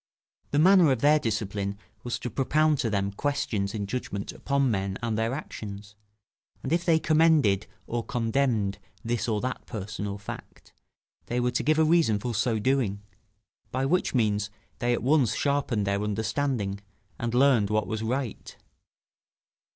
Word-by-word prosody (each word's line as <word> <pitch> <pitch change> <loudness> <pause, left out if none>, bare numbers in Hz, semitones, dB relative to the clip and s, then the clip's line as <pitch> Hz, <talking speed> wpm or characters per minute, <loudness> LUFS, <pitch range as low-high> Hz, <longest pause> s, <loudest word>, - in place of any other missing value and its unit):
The 145 - -1
manner 175 -1 +6
of 130 -3 0
their 150 +1 +5
discipline 100 -4 -2 0.3
was 120 - -2
to 125 - -5
propound 150 +2 +2
to 115 - 0
them 100 -1 0
questions 110 -5 -1
in 100 -2 -2
judgment 100 -3 -4
upon 140 -2 0
men 95 -1 -2
and 115 -2 0
their 115 +1 0
actions; 105 -7 -7 0.7
and - - -1
if 170 0 +1
they 165 -2 +4
commended 155 - +3 0.2
or 120 0 -2
condemned 115 -4 0 0.3
this 120 0 -1
or 105 -2 +1
that 130 0 -4
person 105 -1 -5
or 100 0 -4
fact, 100 - -10 0.5
they 120 +1 -1
were 125 0 +1
to - - 0
give 155 +1 +2
a 160 - +5
reason 160 -9 +3
for 120 +3 -3
so 110 +2 +1
doing; 110 -4 0 0.7
by 130 +1 -1
which 175 0 +1
means 105 -3 +1 0.3
they 120 -1 +1
at 120 - -2
once 135 -5 +3
sharpened 140 -7 0
their 100 0 0
understanding, 110 0 -1 0.4
and 120 0 -2
learned 125 -6 +4
what 105 -1 +1
was 110 0 -3
right. 125 +1 -3
115 Hz, 160 wpm, -27 LUFS, 105-140 Hz, 0.7 s, manner